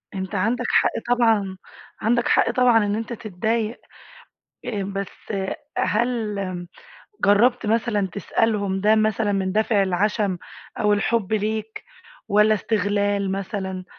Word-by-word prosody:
أنت 190 +2 -4
عندك 225 +6 0
حق - - +3 0.2
طبعًا، 215 -5 +2 0.4
عندك 235 +2 +2
حق - - +3
طبعًا 240 -3 +4
إن 205 0 0
أنت 225 +1 -4
تتضايق. 220 +2 -2 0.9
آآ 210 -5 -3
بس 195 +2 -6 0.5
هل 225 -2 0 0.9
جرّبت 225 +4 +4
مثلًا 215 -3 +1
تسألهم 200 -1 0
ده 215 +2 +4
مثلًا 215 -1 +1
من 190 -1 -1
دافِع 215 0 +2
العشَم 195 +1 0 0.4
أو 210 0 +3
الحُب 205 0 0
ليك 220 +1 -2 0.4
والّا 210 +1 +4
استغلال 205 -1 0
مثلًا؟ 190 -1 -4
210 Hz, 115 wpm, -23 LUFS, 200-225 Hz, 0.9 s, طبعًا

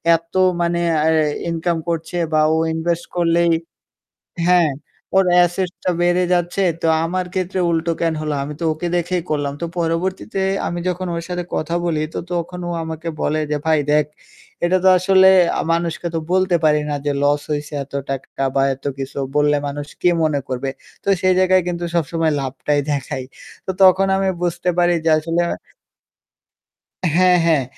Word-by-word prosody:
এত 165 0 -7 0.3
মানে 170 0 +1 0.3
আয়া 160 -1 +3 0.2
ইনকাম 165 +1 -1
করছে 165 +1 -3 0.2
বা 155 - +4
ও - - +1 0.2
ইনভেস্ট 170 +1 -1
করলেই 170 0 +2 1.0
হ্যাঁ 175 -3 +4 0.5
ওর 190 - +5 0.2
asset 175 +1 -1
টা - - +2
বেড়ে 175 +1 +3
যাচ্ছে। 175 +2 +1 0.2
তো - - +1 0.2
আমার 185 +2 -1
ক্ষেত্রে 185 0 -2
উল্টো 165 0 0
কেন 165 -1 +1
হলো? 155 -1 -2
আমি 145 - -5
তো - - -2
ওকে 155 +3 -5
দেখেই 175 +1 -1
করলাম।" 145 -2 -1
তো - - 0
পরবর্তীতে 180 +4 -2 0.3
আমি 175 - -3
যখন 180 +1 -2
ওর 170 - -3
সাথে 180 -1 -3
কথা 165 +2 -2
বলি 165 -3 0
তো - - -2
তখন 175 +1 -3
ও - - -3
আমাকে 160 +1 -6
বলে 155 +1 0
যে, 150 - +1
"ভাই 155 -2 +3
দেখ 150 0 +3 0.6
এটা 185 +2 +3
তো 190 - +7
আসলে 190 +1 +5 0.3
আ - - +1
মানুষকে 170 0 -2
তো - - +1
বলতে 185 -1 +3
পারি 150 -1 +4
না 145 - -1
যে, 145 - 0
লস 145 0 +2
হইছে 150 0 -4
এত 140 - -18 0.2
টাকা 135 0 -5
বা 135 - +3
এত 135 - -21
কিছু 135 +1 -5 0.2
বললে 150 0 +3
মানুষ 145 +1 -5 0.2
কি 180 - +5
মনে 155 -3 +1
করবে? 130 +1 -3 0.4
তো - - -5
সেই 185 0 +4
জায়গায় 185 0 +4
কিন্তু 175 0 -3
সবসময় 165 0 0
লাভটাই 135 +2 -1
দেখাই।" 135 -2 -3 0.4
তো - - -2
তখন 190 +1 +6
আমি 195 0 +1
বুঝতে 175 +1 0
পারি 175 0 +4
যে 165 - +3
আসলে 165 +2 -1 1.8
হ্যাঁ, 180 0 +5
হ্যাঁ 155 -5 +3
170 Hz, 175 wpm, -19 LUFS, 155-180 Hz, 1.8 s, তো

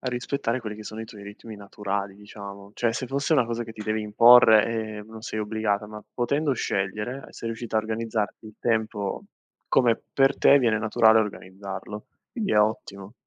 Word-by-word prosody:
rispettare 125 0 -2
quelli 105 -2 -6
che 110 - -9
sono 110 +1 -7
i - - -5
tuoi 105 -2 -12
ritmi 105 +2 -10
naturali 100 -1 -4
diciamo, 100 -1 -11
cioè 115 -1 0
se 130 +2 -4
fosse 140 +4 -1
una 135 -5 +4
cosa 120 0 -3
che 115 - -9
ti 110 - -8
devi 110 +1 -1
imporre, 110 0 +7 0.3
ehm, 105 - -10
non 110 0 -11
sei 110 - -5
obbligata, 105 -1 -1
ma 105 0 -10
potendo 140 +4 0
scegliere 105 +3 -3
sei 115 - -6
riuscita 115 0 -4
a - - +4
organizzarti 110 0 -3
il 110 - -12
tempo 110 -3 -1 0.5
come 120 -3 +3
per 135 0 +3
te 140 - +6
viene 115 -5 +2
naturale 110 0 +4
organizzarlo, 100 0 -6 0.3
quindi 220 -5 -2
è - - +4
ottimo. 100 -1 -2
110 Hz, 180 wpm, -25 LUFS, 105-120 Hz, 0.5 s, imporre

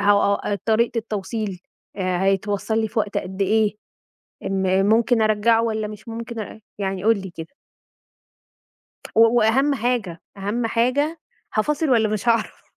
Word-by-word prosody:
ه 200 0 +2
طريقة 230 +1 +2
التوصيل 210 -3 -4 0.4
آآ، 185 -1 -1
هيتوصل 200 +3 0
لي 220 - -1
في 220 - -3
وقت 205 -1 -1
قد 190 +2 -4
إيه، 215 +1 +2 0.7
ام 190 0 +1
ممكن 225 +2 +3
أرجعّه 215 +1 +3
والّا 220 -2 -1
مش 215 +2 -11
ممكن 230 0 -6
أرجع؟ 220 +1 -7 0.2
يعني 195 -2 -2
قل 225 -1 +4
لي 190 - -7
كده. 165 - -8 1.6
و 225 - +6 0.2
وأهم 265 +6 +3
حاجة 225 -8 -2 0.2
أهم 210 +5 -2
حاجة 275 +8 0 0.3
هافاصل 300 +7 +1
والّا 225 -3 +4
مش 215 +2 -2
هاعرف؟ 230 -2 0
215 Hz, 140 wpm, -22 LUFS, 200-230 Hz, 1.6 s, و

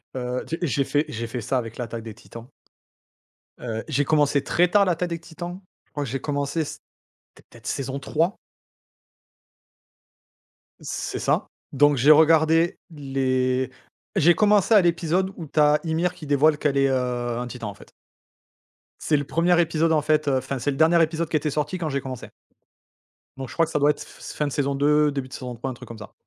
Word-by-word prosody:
Heu, 125 0 -3
tu 165 - -3
j'ai 140 -3 +1
fait 145 +1 +1
j'ai 115 -5 -5
fait 120 +1 -5
ça 130 +4 -1
avec 115 -2 -7
l'Attaque 115 -2 -5
des 110 - -8
Titans 115 +2 -12 1.1
heu, 115 -2 -5
j'ai 140 +2 0
commencé 145 -2 +2
très 180 +1 +2
tard 200 +1 +4
l'Attaque 175 0 -1
des 170 -1 -4
Titans, 175 +3 -8 0.3
je - - -40
crois 145 0 -3
que 135 - -5
j'ai 135 +2 -3
commencé, 145 +2 -1
c'était 145 - -11 0.5
peut-être - - -15
saison 135 0 -3
3. 160 +6 -1 2.4
C'est - - -4
ça. - - 0 0.3
Donc 145 +1 +4
j'ai 140 +5 +6
regardé 160 +2 +4
les 130 -4 -1 0.5
j'ai 175 +3 +5
commencé 210 +2 +3
à 210 - +8
l'épisode 175 +2 +1
où 165 - -6
tu 150 - -2
as 150 0 +5
Ymir 165 +2 0
qui 170 - -11
dévoile 145 +2 +3
qu'elle 145 -2 0
est, 135 0 +4
heu, 125 -2 -1
un 125 0 -4
titan, 120 -3 -6
en - - -7
fait. 100 - -17 1.1
C'est 155 - +1
le 145 - +1
1er 170 +4 +2
épisode, 160 0 +1
en 155 - +3
fait, 155 0 +1
heu, 135 -2 +3
enfin 130 0 -3
c'est 145 - -1
le 135 - -5
dernier 165 +2 +5
épisode 165 0 0
qui 155 - +2
était 150 - -2
sorti 150 +5 -2
quand 170 -3 -3
j'ai 140 -2 -2
commencé 130 -2 -7 1.1
donc 135 - -5
je - - -9
crois 165 - +2
que - - -10
ça - - 0
doit 145 +1 +4
être - - -8
f - - -12
s - - -8
fin 150 - -1
de 145 - -4
saison 140 0 -1
2, 150 +1 +3
début 135 -2 -4
de 130 - -14
saison 125 -2 -6
3, 125 +4 -5
un 130 - -4
truc - - -12
comme 115 - -9
ça. 110 0 -11
145 Hz, 205 wpm, -24 LUFS, 130-160 Hz, 2.4 s, à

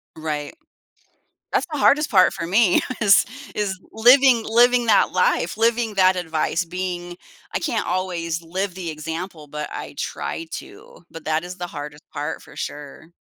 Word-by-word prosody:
Right. 155 - -4 1.0
That's - - +1
the 300 - -2
hardest 295 +3 +4
part 185 -5 +5
for 165 - -4
me, 190 0 +4 0.2
is 200 -3 +6 0.3
is 200 -2 -1
living 245 +1 +5
living 240 +2 +4
that 220 -3 +4
life, - - +1
living 230 -1 +1
that 185 -1 +5
advice, 165 0 -1
being 175 0 -5 0.4
I - - 0
can't 270 -9 -1
always 175 -2 -2
live 185 +3 -3
the 180 -2 -5
example, 160 +1 -6
but 150 +1 -5
I - - -7
try 165 - -4
to, - - -10
but 165 - -10
that 155 +1 0
is 180 +1 -8
the 175 - -4
hardest 150 -1 -8
part, 150 +2 -4
for - - -16
sure. 150 +3 -7
180 Hz, 160 wpm, -22 LUFS, 160-220 Hz, 1.0 s, is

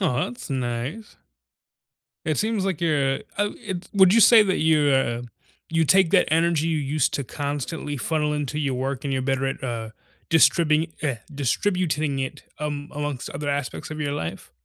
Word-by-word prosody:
Aw, 165 -9 +1
that's 120 - -8
nice. 130 - -4 1.1
It 155 -1 0
seems 215 -2 0
like 190 -5 -2
you're 145 -5 +2 0.2
uh, 205 0 +1
it 185 -3 -5
would 190 -1 +6
you 230 - +5
say 230 0 +8
that 190 -3 0
you, 155 -2 +3
ah 120 -2 0 0.4
you 165 0 +2
take 190 +1 +4
that 185 - +4
energy 165 -1 +2
you 160 -1 0
used 145 0 0
to 140 - -1
constantly 145 +2 -4
funnel 150 +1 0
into 150 0 -2
your 140 -3 0
work 135 +1 -3
and 140 - -1
you're 130 - 0
better 135 0 0
at, 135 0 -4
ah, 115 -3 -4 0.4
distribing 160 -1 +4
eh, 140 -6 0 0.2
distributing 155 0 0
it, 135 0 -4 0.2
am 145 -1 -3
amongst 145 -3 -4
other 145 -1 -4
aspects 140 0 -4
of 155 0 -5
your 145 -1 -1
life? 80 - -5
150 Hz, 175 wpm, -24 LUFS, 135-165 Hz, 1.1 s, say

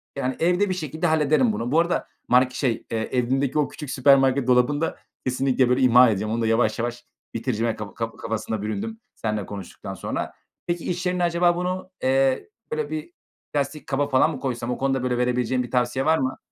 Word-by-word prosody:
yani, 130 -2 -1
evde 180 +4 +2
bir - - +1
şekilde 160 0 -2
hallederim 160 - +3
bunu. 120 - -3
Bu 160 - +4
arada 170 +1 0 0.2
mark 125 +1 +4
şey, 125 -3 -1
eee, 115 - 0
evimdeki 130 +3 +1
o 145 - +2
küçük 150 -4 -8
süpermarket 135 -1 +4
dolabını 125 +4 +3
da 165 - -1 0.3
kesinlikle 130 0 +2
böyle 125 +1 +2
imha 125 -1 +7
ediyorum. 110 +2 -1
Onu 115 - -1
da 115 - +1
yavaş 115 -1 +2
yavaş 120 +1 -3 0.3
bitireceğime 115 -1 -1
kap 105 -2 -8
kaf 115 -1 -4
kafasına 110 -1 -3
büründüm 220 - -4 0.2
seninle 105 -3 -2
konuştuktan 100 -3 -8
sonra. - - -4 0.3
Peki, 175 -1 -2
iş 180 +1 -2
yerinde 180 0 0
acaba 175 0 +3
bunu, 185 +1 -3
eee, 135 - +2 0.2
böyle 460 -1 -2
bir 315 +2 -5 0.4
plastik 145 +1 -2
kaba 140 +1 0
falan 145 +3 +3
mı - - -6
koysam? 125 -2 -3
O - - -2
konuda 135 -1 0
böyle 125 -1 0
verebileceğin 125 0 +1
bir 120 - -9
tavsiye 125 +2 +1
var 160 +1 +4
mı? 130 -2 -1
130 Hz, 195 wpm, -24 LUFS, 120-160 Hz, 0.4 s, imha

